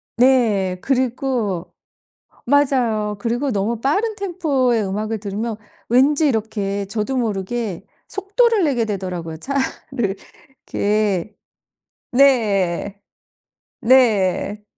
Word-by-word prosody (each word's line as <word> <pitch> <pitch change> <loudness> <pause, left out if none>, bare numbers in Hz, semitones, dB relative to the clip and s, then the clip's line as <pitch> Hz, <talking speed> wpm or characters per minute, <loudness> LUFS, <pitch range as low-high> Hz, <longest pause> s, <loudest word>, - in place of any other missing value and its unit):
네. 230 -7 +3
그리고 250 -8 -1 0.7
맞아요. 240 -6 +2
그리고 240 +5 -1
너무 215 +3 -1
빠른 410 - 0
템포의 295 - 0
음악을 215 +3 -3
들으면 215 +3 -3 0.3
왠지 280 +5 +4
이렇게 205 -4 -1
저도 215 +6 -3
모르게 210 -3 -2 0.2
속도를 415 +2 +1
내게 255 -5 +1
되더라고요 180 -6 -4
차를 265 - -2 0.5
이렇게 210 -2 0 0.8
네. 205 -8 +2 0.8
네. 210 -4 +3
225 Hz, 205 characters per minute, -20 LUFS, 200-265 Hz, 0.8 s, 왠지